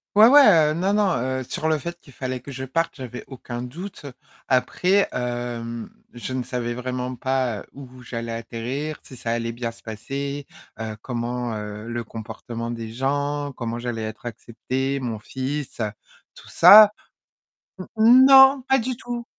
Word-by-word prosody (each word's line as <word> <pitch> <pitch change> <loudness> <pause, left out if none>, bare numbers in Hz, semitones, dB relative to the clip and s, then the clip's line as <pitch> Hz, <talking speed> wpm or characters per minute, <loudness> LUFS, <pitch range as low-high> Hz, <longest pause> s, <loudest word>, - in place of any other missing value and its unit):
Ouais, 215 +2 +9
ouais, 290 +3 +8 0.3
heu, - - -1
non 185 +4 0
non, 205 -2 +3 0.3
heu, - - -4
sur 160 +5 -2
le 155 - +2
fait 170 +4 -6
qu'il 135 - -17
fallait 130 0 -5
que 140 - -10
je 130 0 -5
parte, 165 +6 -1
j'avais 125 -2 -7
aucun 120 -2 -7
doute. 155 +7 -8 0.4
Après, 180 +10 +2
hem, 120 -2 -4 0.2
je 120 +1 -6
ne 130 -1 -2
savais 120 -1 -3
vraiment 125 +1 -4
pas, 130 -3 -1
heu, - - -13
où 130 -2 -12
j'allais 115 -1 -5
atterrir, 120 +6 -5
si 130 - -12
ça 115 -1 -4
allait 115 0 -2
bien 120 -1 -4
se 115 - -17
passer, 140 +6 -5 0.4
heu, 110 -1 -5
comment, 120 -1 -3
heu 105 +1 -7
le 120 0 -3
comportement 115 +1 -7
des 115 -2 -6
gens, 145 +3 -2
comment 115 -1 -4
j'allais 120 -2 -4
être 110 +2 -7
acceptée, 130 +4 -3
mon 120 -4 -3
fils, 130 +5 -5
heu, 105 -2 -2 0.4
tout - - -15
ça. 210 0 +9 1.0
Mmh 240 +4 +7
non, 270 0 +8
pas 265 - +5
du 250 +1 -2
tout. 240 -1 -6
125 Hz, 170 wpm, -23 LUFS, 115-145 Hz, 1.0 s, Ouais